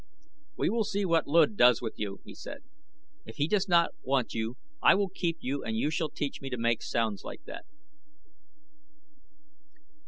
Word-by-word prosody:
"We - - +1
will 225 0 +1
see 200 -1 -1
what 165 -3 +2
Luud 170 +8 +4
does 125 - +6
with 115 -2 -6
you," 100 -2 -4
he - - -10
said. 285 0 -9 0.6
"If - - -11
he 145 0 +1
does 205 +1 +1
not 170 -2 +4
want 130 -2 0
you 115 +2 -3 0.2
I - - +7
will 200 0 +1
keep 170 -3 -2
you 135 +2 -2
and 110 -1 -2
you 145 +7 +1
shall 160 -1 -1
teach 140 0 -4
me 135 - -5
to 125 - -3
make 115 -1 +1
sounds 110 -4 -1
like - - -8
that." - - -9
145 Hz, 180 wpm, -29 LUFS, 115-175 Hz, 0.6 s, I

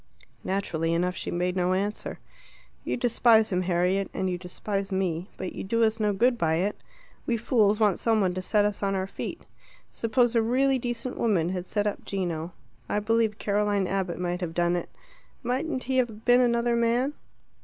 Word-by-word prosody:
Naturally 165 -4 -1
enough 180 +2 0
she - - -4
made 180 +1 -1
no 180 0 +1
answer. 200 +3 -2 0.7
"You - - -2
despise 230 -2 +4
him, 180 -1 +1
Harriet, 185 +2 +1
and 190 - -1
you - - -1
despise 195 +2 -4
me. 185 -1 -1
But 185 - -5
you - - -5
do 230 +4 +1
us 220 0 +2
no 210 -1 +2
good 240 +4 +2
by 160 -1 +2
it. 195 +5 0 0.5
We 235 - +1
fools 215 -2 +2
want 210 -4 +3
some 225 -2 +2
one 185 -3 +1
to 185 - -3
set 205 +2 +2
us 210 -1 -2
on 195 -1 0
our 190 0 -1
feet. 195 - -6 0.5
Suppose 240 +1 +1
a 230 - +5
really 260 +4 +2
decent 245 +1 -4
woman 185 -8 +2
had 180 -1 -4
set 205 -1 -1
up 210 - -2
Gino 175 -4 -3 0.4
I - - 0
believe 220 0 +1
Caroline 205 -1 +1
Abbott 190 -2 -2
might 180 0 -2
have 165 -2 -4
done 175 0 +2
it 175 - -3 0.5
mightn't 260 +3 -1
he 260 +1 -1
have 225 -4 -1
been 245 0 +6
another 235 -1 +2
man?" 235 +4 +1
205 Hz, 190 wpm, -27 LUFS, 180-230 Hz, 0.7 s, been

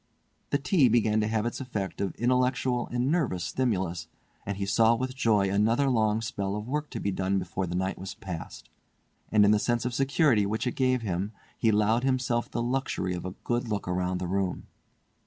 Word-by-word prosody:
The 140 - +2
tea 145 -2 +3
began 110 -2 +3
to 105 - 0
have 110 0 0
its 120 - -3
effect 100 -9 -4
of 100 -2 -2
intellectual 125 0 +1
and 125 +3 0
nervous 130 - 0
stimulus, 95 -8 -1 0.4
he 100 0 -2
saw 110 +3 +4
with 130 +2 -3
joy 110 -7 +3
another 115 +7 +2
long 110 -2 +2
spell 100 -3 -3
of 105 +1 -5
work 150 +3 -2
to 115 - -5
be 100 - -1
done 95 +1 0
before 95 0 -3
the 85 - -4
night 95 +1 -1
was 95 +1 -6
past, 95 -7 -7 0.6
and 105 -1 +5
in 100 - +5
the 105 - +4
sense 120 +1 0
of 125 - -1
security 135 -3 +3
which 110 +4 -2
it 125 - -1
gave 130 -2 +1
him, 100 +1 -2 0.2
he 115 - +1
allowed 110 +3 +2
himself 125 -3 0
the 120 - -2
luxury 120 -7 -1
of 90 - -5
a 95 +1 -5
good 120 0 -1
look 105 -2 -2
round 90 0 -1
the - - -3
room. 95 0 -2
110 Hz, 200 wpm, -28 LUFS, 95-125 Hz, 0.6 s, and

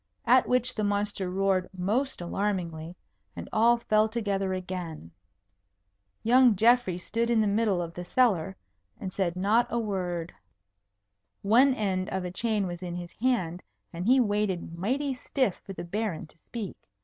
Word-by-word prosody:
At 250 +1 +5
which 250 0 +2
the 215 - -2
monster 205 -2 -1
roared 190 0 +1
most 220 +7 -1
alarmingly, 175 -3 -3 0.4
and 85 0 -7
all 235 +2 +5
fell 215 -1 +2
together 200 -4 -1
again. 180 - -5 1.1
Young 245 0 +5
Geoffrey 225 -3 +3
stood 230 +6 -2
in 235 -2 +3
the 215 - +3
middle 205 -3 +1
of 165 0 -7
the 175 - -6
cellar, 190 -4 +1 0.4
and 185 -2 -5
said 180 -3 -1
not 210 +6 +2
a 235 - -1
word. 180 -6 -3 1.1
One 250 +6 +5
end 190 -4 -1
of 190 -1 -3
a 180 - -4
chain 215 +1 0
was 175 -1 -5
in 175 -1 -5
his 175 0 -6
hand, 185 -9 -1 0.3
and 170 +1 -4
he 260 +2 +6
waited 205 -7 0
mighty 265 +10 -1
stiff 255 -5 -1
for 195 - -8
the - - -6
Baron 195 -1 -3
to 155 - -23
speak. 220 0 -7
200 Hz, 160 wpm, -28 LUFS, 180-230 Hz, 1.1 s, he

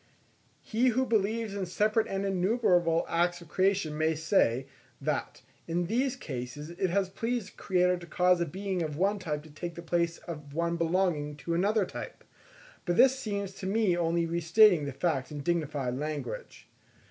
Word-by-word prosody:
He 235 +4 +1
who 255 +2 +2
believes 220 -1 0
in 195 -2 -3
separate 215 +5 +1
and 195 0 -2
innumerable 180 -4 +2
acts 175 +1 +1
of 170 -3 -14
creation 185 -3 +1
may 160 +1 +1
say, 150 - +2 0.3
that - - -3 0.2
in 170 +1 0
these 250 +7 0
cases 145 - -6
it 180 +2 -1
has 195 +2 +1
pleased 225 +2 -3
the - - -24
Creator 180 -1 +2
to 175 -1 -11
cause 180 +2 +3
a 170 - 0
being 190 +3 -3
of 150 -3 -3
one 200 +4 +1
type 150 -5 -3
to 155 - -14
take 170 +3 -6
the 170 - -8
place 170 0 0
of 150 -4 -9
one 170 +1 0
belonging 165 -3 0
to 145 +4 -4
another 200 +4 +2
type; - - -8 0.6
but 175 -2 -1
this 265 0 +6
seems 200 -5 -3
to 190 0 -6
me 200 -2 +2
only 170 0 +1
restating 170 +1 +4
the 140 - -3
fact 135 -1 -1
in 145 -1 -5
dignified 145 -6 -1
language. 155 - -5
175 Hz, 175 wpm, -29 LUFS, 160-200 Hz, 0.6 s, this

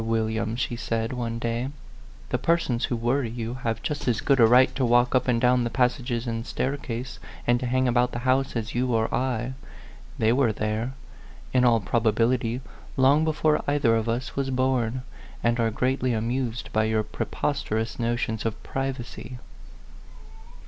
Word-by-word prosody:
William," 110 0 -1
she 120 0 -2
said, 115 0 -2
one 115 -2 -3
day, 115 +2 -2 0.6
"the - - 0
persons 150 -8 +1
who 120 - -2
worry 120 +2 0
you 115 0 -4
have 115 -3 -3
just 145 -2 -3
as 120 -3 +2
good 140 -2 +2
a 115 - +8
right 125 +3 +5
to 135 - -1
walk 120 0 +4
up 130 - +2
and 120 -2 +2
down 125 0 +3
the 120 - -1
pas 125 0 +2
sages 120 -3 -4
and 115 -1 -2
staircase, 130 -2 -3 0.3
and 120 0 +3
to 125 - -3
hang 130 +1 +2
about 125 0 +2
the - - -4
house, 130 +1 +2
as 110 -1 -3
you 125 0 +1
or 110 0 0
I. 125 -1 -1 0.6
They 110 +1 +3
were 125 -3 +3
there, 110 +4 -2 0.6
in 125 - +4
all 115 -2 +5
probability, 115 +3 +1 0.4
long 135 +4 +5
before 155 -1 +1
either 145 -5 +3
of 115 0 0
us 120 +3 -2
was 135 -1 -1
born, 130 -2 0 0.4
and 120 +1 +2
are 115 -1 +3
greatly 125 +2 0
amused 120 +1 -2
by 110 0 +3
your 110 0 +1
pre 110 - -4
posterous 115 -6 -2
notions 115 -2 -1
of 115 -1 -3
privacy." 130 -2 -5
120 Hz, 175 wpm, -26 LUFS, 115-130 Hz, 0.6 s, a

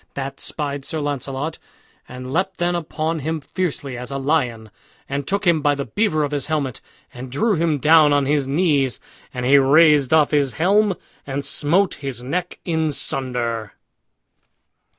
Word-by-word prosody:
That 135 0 -5
spied 145 -2 -4
Sir 160 +3 -4
Launcelot, 145 +1 -3 0.5
and 125 +1 -7
leapt 185 +3 -1
then 175 0 0
upon 160 -1 -2
him 160 +3 -2
fiercely 145 -4 -4
as 125 - -6
a 135 - -3
lion, 125 -7 -1 0.4
and 140 0 -3
took 200 +1 -1
him 170 -3 +3
by 145 -1 +2
the 140 -1 -4
beaver 205 -8 0
of 145 - -2
his 145 -2 -2
helmet, 145 -6 -2 0.3
and 125 +1 -8
drew 215 - +1
him 165 -3 +1
down 150 +2 +5
on 145 -1 +3
his 145 -1 +1
knees. 140 -4 +1 0.3
And 125 -1 -4
he 140 +2 +6
raised 145 0 +5
off 155 -2 +4
his 145 -3 +1
helm, 200 +3 +2 0.3
and 140 +1 -3
smote 175 +6 +2
his 130 -3 -5
neck 175 +7 -3
in 160 -3 0
sunder. 120 -6 -2
145 Hz, 165 wpm, -21 LUFS, 135-160 Hz, 0.5 s, he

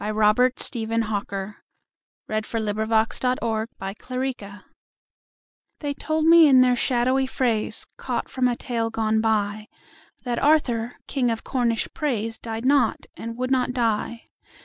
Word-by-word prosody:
Robert 215 +4 +2
Stephen 230 -2 0
Hawker 200 -1 -4 0.7
1804–75 220 0 0
To 250 -1 0
Alfred 220 -3 -3
Tennyson 250 -6 -5 1.2
THEY 290 -2 -2
told 310 +2 -1
me 330 -1 +8
in 260 -2 +7
their 250 -1 +4
shadowy 255 +2 +1
phrase, 235 -5 -1
Caught - - -3
from 255 -1 0
a 245 - 0
tale 235 -2 -2
gone 220 -1 0
by, 215 -1 0 0.6
That 245 -2 -2
Arthur, 245 -6 +2
King 255 -4 0
of 225 -1 -3
Cornish 235 -4 0
praise, 230 -7 -2
Died 225 +1 -5
not, 270 -4 +2
and 230 0 -7
would 255 +1 -2
not 250 -1 +1
die. 230 -1 -1
230 Hz, 130 wpm, -24 LUFS, 220-255 Hz, 1.2 s, me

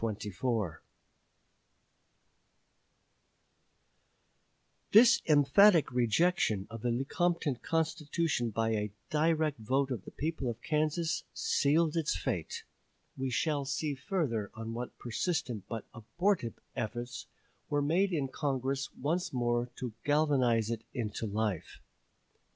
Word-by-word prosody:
This 230 +3 +8
emphatic 155 +4 +6
rejection 120 - +2
of 115 -1 -7
the 120 - 0
Lecompton 145 +3 0
Constitution 160 -4 -1
by 115 +1 0
a 105 -2 -1 0.2
direct 155 -2 +2
vote 130 +5 0
of 115 -7 -3
the - - -9
people 150 -4 -3
of 115 - -5
Kansas 155 +2 0
sealed 155 +3 +2
its 160 - +1
fate. 90 -3 -3 0.5
We 135 0 -2
shall 145 +3 0
see 145 +2 -2
further 130 - -2
on 115 0 -5
what 120 +1 -6
persistent 120 - -2
but 115 -3 -4
abortive 165 - -1 0.2
efforts 120 +2 -4 0.4
were 145 -1 +1
made 180 +7 +2
in 145 -6 0
Congress 135 -1 -2
once 165 +6 -1
more 120 -1 0
to 125 -4 -5
galvanize 130 -7 +2
it 115 -1 -3
into 110 -1 -3
life. 105 -3 -2
135 Hz, 105 wpm, -31 LUFS, 115-160 Hz, 0.5 s, This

